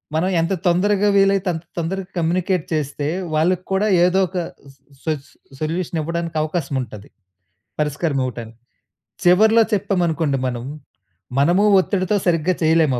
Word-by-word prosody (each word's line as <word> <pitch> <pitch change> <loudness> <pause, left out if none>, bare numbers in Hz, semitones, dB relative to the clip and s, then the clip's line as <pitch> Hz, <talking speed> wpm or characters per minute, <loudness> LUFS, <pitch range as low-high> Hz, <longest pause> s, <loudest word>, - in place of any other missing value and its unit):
మనం 180 +4 +1
ఎంత 165 +4 0
తొందరగా 205 +3 +2
వీలైతే 195 0 +3
అంత 165 +1 -6
తొందరగా 185 +3 -3
కమ్యూనికేట్ 175 +1 0
చేస్తే, 145 -1 -2 0.3
వాళ్ళకి 180 +3 +1
కూడా 200 +3 +2 0.2
ఏదో 180 +2 +2
ఒక 185 +2 -6 0.4
స్ - - -30 0.3
సొ 160 - 0 0.2
సొ - - -23 0.3
సొల్యూషన్ 165 +1 -2
ఇవ్వడానికి 170 +1 -3
అవకాశం 155 -3 -2
ఉంటది. 105 -4 -9 0.7
పరిస్కారం 150 0 -1
ఇవ్వటానికి. 115 -2 -7 0.7
చివర్లో 220 +6 +6
చెప్పామనుకోండి 170 -7 0
మనం, 120 -1 -4 0.8
మనము 175 +7 +3 0.2
ఒత్తిడితో 195 +1 0
సరిగ్గా 170 +1 +2
చేయలేం 160 -3 +3
170 Hz, 130 wpm, -20 LUFS, 155-185 Hz, 0.8 s, చివర్లో